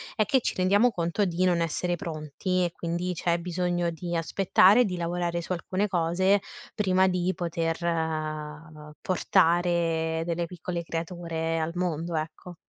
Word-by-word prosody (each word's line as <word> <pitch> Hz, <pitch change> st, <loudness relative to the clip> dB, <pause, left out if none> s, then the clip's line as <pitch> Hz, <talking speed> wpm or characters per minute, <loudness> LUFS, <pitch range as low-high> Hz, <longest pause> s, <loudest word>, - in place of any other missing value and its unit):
è 215 Hz, -, +2 dB
che 265 Hz, -, +3 dB
ci -, -, -2 dB
rendiamo 200 Hz, +6 st, +4 dB
conto 175 Hz, +2 st, 0 dB
di 180 Hz, 0 st, -1 dB
non 175 Hz, -2 st, +3 dB
essere 175 Hz, +2 st, -1 dB
pronti, 170 Hz, +3 st, -2 dB
e 175 Hz, -, 0 dB
quindi, 170 Hz, +2 st, -3 dB
c'è 170 Hz, 0 st, 0 dB
bisogno 175 Hz, 0 st, -1 dB
di 170 Hz, +1 st, -5 dB
aspettare, 195 Hz, +6 st, +4 dB
di 180 Hz, -3 st, -3 dB
lavorare 170 Hz, 0 st, -2 dB
su -, -, -8 dB
alcune 185 Hz, +3 st, -1 dB
cose, 185 Hz, +2 st, +2 dB, 0.3 s
prima 190 Hz, -2 st, +3 dB
di 180 Hz, 0 st, +1 dB
poter, 165 Hz, -1 st, -2 dB
ehm, 155 Hz, -2 st, -3 dB
portare 165 Hz, -2 st, +1 dB
delle 170 Hz, 0 st, -1 dB
piccole 175 Hz, 0 st, -5 dB
creature 165 Hz, -1 st, -3 dB
al 160 Hz, +1 st, -1 dB
mondo, 170 Hz, -2 st, -2 dB
ecco. 155 Hz, +3 st, -5 dB
170 Hz, 145 wpm, -27 LUFS, 165-180 Hz, 0.3 s, rendiamo